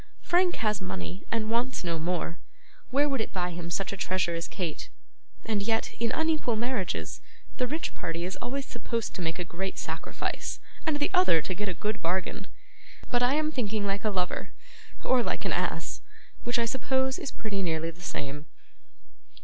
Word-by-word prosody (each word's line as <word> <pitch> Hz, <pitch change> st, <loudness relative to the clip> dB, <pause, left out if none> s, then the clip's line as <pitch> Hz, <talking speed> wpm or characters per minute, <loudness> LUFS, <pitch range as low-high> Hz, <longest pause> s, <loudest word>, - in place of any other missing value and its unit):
Frank 355 Hz, 0 st, +4 dB
has 215 Hz, -2 st, +1 dB
money, 185 Hz, 0 st, -4 dB
and 220 Hz, -1 st, +1 dB
wants 240 Hz, +1 st, +1 dB
no 170 Hz, -2 st, 0 dB
more. 170 Hz, 0 st, -1 dB, 0.5 s
Where 285 Hz, +3 st, +4 dB
would 270 Hz, -5 st, +1 dB
it -, -, -3 dB
buy 180 Hz, -1 st, 0 dB
him 170 Hz, 0 st, -4 dB
such 195 Hz, +3 st, 0 dB
a -, -, -4 dB
treasure 185 Hz, -2 st, +1 dB
as 165 Hz, 0 st, -1 dB
Kate? 170 Hz, -6 st, -3 dB, 0.6 s
And 215 Hz, -2 st, +1 dB
yet, 225 Hz, +2 st, +1 dB
in 230 Hz, 0 st, +2 dB
unequal 315 Hz, -7 st, +2 dB
marriages, 230 Hz, -4 st, -1 dB, 0.4 s
the 250 Hz, -, +2 dB
rich 315 Hz, +5 st, -1 dB
party 170 Hz, 0 st, -2 dB
is 185 Hz, -, -2 dB
always 265 Hz, +3 st, -2 dB
supposed 230 Hz, -1 st, -2 dB
to -, -, -4 dB
make 165 Hz, 0 st, 0 dB
a 180 Hz, -, -1 dB
great 185 Hz, +3 st, -3 dB
sacrifice, -, -, -2 dB, 0.3 s
and 310 Hz, -2 st, +4 dB
the 290 Hz, -, +1 dB
other 365 Hz, -, +6 dB
to 185 Hz, -, -1 dB
get 205 Hz, +2 st, -1 dB
a 180 Hz, -, -2 dB
good 210 Hz, +4 st, -1 dB
bargain! 180 Hz, +3 st, 0 dB, 0.6 s
But 245 Hz, -, +4 dB
I 250 Hz, +3 st, +5 dB
am 310 Hz, 0 st, +2 dB
thinking 220 Hz, -6 st, 0 dB
like 200 Hz, 0 st, 0 dB
a 215 Hz, -, +3 dB
lover, 185 Hz, -3 st, -1 dB, 0.5 s
or 255 Hz, -1 st, +5 dB
like -, -, -1 dB
an -, -, +2 dB
ass: -, -, -1 dB, 0.4 s
which 240 Hz, 0 st, +2 dB
I 235 Hz, -, +3 dB
suppose 265 Hz, +2 st, +1 dB
is -, -, -3 dB
pretty 205 Hz, -3 st, -2 dB
nearly 165 Hz, -2 st, +1 dB
the 170 Hz, +2 st, -17 dB
same. 145 Hz, -3 st, -3 dB
210 Hz, 185 wpm, -30 LUFS, 180-250 Hz, 0.6 s, other